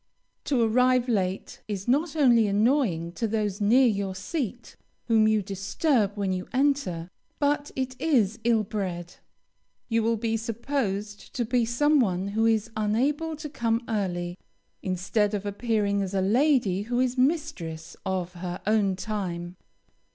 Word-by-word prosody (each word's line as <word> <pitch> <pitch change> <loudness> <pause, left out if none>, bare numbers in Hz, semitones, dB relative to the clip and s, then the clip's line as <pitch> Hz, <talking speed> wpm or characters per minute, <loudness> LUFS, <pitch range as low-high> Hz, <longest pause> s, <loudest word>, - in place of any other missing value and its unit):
To 270 -4 +1
arrive 250 +2 +3
late 195 -5 -2
is 200 -1 -4
not 290 +5 +1
only 240 -7 +5
annoying 205 - +1
to 225 +6 -2
those 210 -2 -2
near 240 +6 +5
your 200 -4 0
seat, 240 - -4 0.3
whom 220 -2 +4
you 215 -1 +2
disturb 200 - 0
when 195 -2 0
you 185 0 -4
enter, 260 - 0 0.3
but 290 0 0
it 260 -1 -4
is 230 -9 +2
ill 230 -2 +3
bred; 180 -4 -4 0.7
you 230 -1 +2
will 230 +1 +1
be 225 0 -1
supposed 220 -3 -3
to 240 - 0
be 240 0 +1
some 290 +6 +3
one 190 -4 0
who 220 +2 +1
is 225 0 +1
unable 270 +10 0
to 305 0 -7
come 230 -4 -1
early, 180 -4 -2 0.4
instead 200 +3 0
of 205 0 -4
appearing 205 -1 0
as 195 0 -3
a 190 - +2
lady 225 -2 +2
who 240 +4 -2
is 255 -1 +1
mistress 255 - -1
of 185 -2 -2
her 180 0 -5
own 205 -2 +2
time. 180 -4 -4
220 Hz, 150 wpm, -26 LUFS, 195-250 Hz, 0.7 s, only